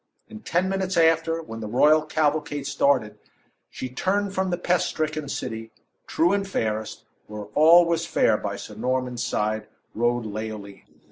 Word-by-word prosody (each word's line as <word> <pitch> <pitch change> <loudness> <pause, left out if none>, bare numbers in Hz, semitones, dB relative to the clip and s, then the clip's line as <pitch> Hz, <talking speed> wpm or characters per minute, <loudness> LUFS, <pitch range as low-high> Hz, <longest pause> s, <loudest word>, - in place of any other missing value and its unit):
In 220 0 -10
ten 185 -3 0
minutes 190 -1 -1
after, 165 0 +3
when 115 -7 -8
the 110 - -5
royal 150 +8 +4
cavalcade 150 -2 -1
started, 130 -9 +1 0.5
she 130 - -6
turned 195 +10 -1
from 190 -1 0
the 175 - -1
pest 180 0 +1
stricken 155 -2 -3
city, 110 -4 -5 0.4
too 175 +4 +2
and 200 -1 0
fairest, 110 - -3 0.2
where 105 -1 -7
all 165 +5 +7
was 170 0 -1
fair, - - +3
by - - -3
Sir - - -9
Norman's 125 -1 -2
side 105 0 -1 0.3
rode 120 +1 0
Leoline. 105 -2 -7
150 Hz, 155 wpm, -24 LUFS, 115-170 Hz, 0.5 s, all